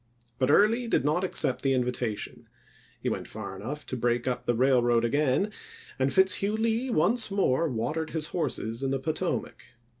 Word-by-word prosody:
But 130 0 +2
Early 225 +9 +4
did 145 - +1
not 155 +5 +1
accept 135 -8 0
the 135 -1 +2
invitation; 125 -4 -3 0.5
he - - -5
went - - -2
far 95 - -7
enough 135 +10 -6
to - - -4
break 120 0 0
up 125 - -2
the 120 - +2
railroad 120 -2 +3
again, 145 - +1 0.5
and 130 +1 +2
Fitzhugh 190 +4 +3
Lee 230 +3 0
once 230 +3 +2
more 165 -6 +1
watered 150 +7 -2
his 160 0 -3
horses 115 -9 -3
in 135 - -1
the 135 - 0
Potomac. 155 -1 -3
140 Hz, 170 wpm, -27 LUFS, 125-190 Hz, 0.5 s, Early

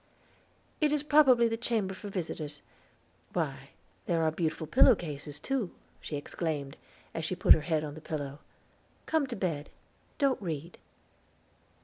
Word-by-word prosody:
"It 300 -1 +4
is 295 -1 +1
probably 270 -6 +6
the 225 0 -1
chamber 225 -5 0
for 200 +2 -8
visitors. 160 -6 -4 0.7
Why, - - -2 0.4
these 170 - +2
are 160 -1 +2
beautiful 160 -1 -2
pillow 250 - +6
cases, 150 -4 -6
too," 260 - -1 0.3
she 150 - -5
exclaimed, 145 -1 -3 0.4
as 165 - -3
she 175 +4 -1
put 180 - +8
her 160 - +1
head 155 -1 0
on 150 -1 -5
the 155 - -10
pillow. 145 -2 -4 0.7
"Come 315 -3 +1
to - - -4
bed; 165 -6 -2 0.5
don't 275 -5 +2
read." 165 -2 -5
170 Hz, 145 wpm, -30 LUFS, 150-235 Hz, 0.7 s, put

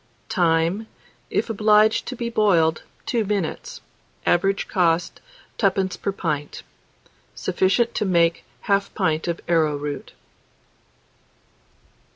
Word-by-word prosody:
Time. 170 +4 +1 0.4
If - - 0
obliged 215 0 +3
to 255 - -4
be 235 -1 -4
boiled, 170 -8 +3 0.2
2 235 -3 0
minutes. 200 -5 -3 0.4
Average 195 +3 +1
cost, 170 -2 0 0.4
2d. 190 -3 0
per 200 - -1
pint. 155 -6 -4 0.7
Sufficient 230 +5 +1
to 210 - -1
make 170 -3 +2 0.2
1/2 200 0 0
pint 160 -6 0
of 170 -1 -2
arrowroot. 150 -3 -1
185 Hz, 100 wpm, -23 LUFS, 165-210 Hz, 0.7 s, obliged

